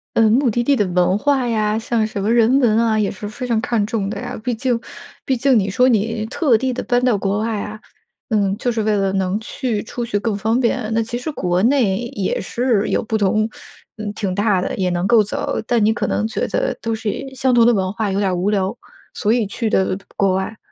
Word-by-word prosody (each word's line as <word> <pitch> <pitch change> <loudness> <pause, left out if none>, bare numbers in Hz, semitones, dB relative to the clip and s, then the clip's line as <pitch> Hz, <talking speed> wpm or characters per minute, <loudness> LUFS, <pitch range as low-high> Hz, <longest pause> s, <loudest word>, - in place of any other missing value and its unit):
呃， 225 - +4
目 250 +2 +3
的 240 +2 0
地 280 +3 +3
的 210 -6 +1
文 180 +1 +2
化 265 +3 +1
呀， 215 -2 0
像 225 -1 0
什 205 -2 -5
么 215 - +1
人 240 +3 +4
文 235 -5 +3
啊， 225 -2 +2
也 210 -2 +1
是 205 +1 -7
非 250 +4 -6
常 230 -3 0
看 225 -3 0
重 210 -3 -2
的 205 -1 -4
呀？ 245 -2 -6
毕 245 -1 -1
竟 245 0 0 0.5
毕 260 -2 +1
竟 265 0 +3
你 195 -1 -1
说 250 +6 +3
你 225 -1 +1
特 275 0 +2
地 260 +2 -1
地 250 - -3
搬 245 0 +1
到 245 - +3
国 195 +1 0
外 220 -1 -1
啊， 210 +1 -7 0.5
嗯， 200 -3 +1
就 245 +1 -1
是 225 -1 -1
为 215 0 +1
了 195 -1 0
能 190 +1 0
去 225 -1 -3
出 240 +2 -5
去 205 -3 -1
更 210 0 -1
方 220 +4 0
便。 235 -2 0
那 230 - +2
其 235 +2 -4
实 305 +5 -4
国 180 -6 0
内 230 -5 +3
也 200 -5 -2
是 235 -1 0
有 - - 0
不 220 0 -3
同 215 +1 +2 0.5
嗯， 215 -1 -4
挺 195 -4 -2
大 205 -1 +2
的， - - -2
也 185 -1 0
能 175 0 -1
够 235 -1 +5
走， 205 - -3
但 235 -3 +2
你 220 - +3
可 - - -2
能 215 - 0
觉 - - -2
得 - - -1
都 225 -1 -1
是 220 -1 -2 0.2
相 260 0 +1
同 235 -1 +5
的 - - +6
文 190 -1 -1
化 210 -2 -2
有 190 - -1
点 195 -2 +1
儿 - - -1
无 180 +3 0
聊， 200 0 0 0.4
所 215 - 0
以 235 -3 +1
去 220 +3 -2
的 190 -2 +1 0.2
国 195 -2 +2
外。 190 +4 -3
220 Hz, 265 characters per minute, -19 LUFS, 200-240 Hz, 0.5 s, 的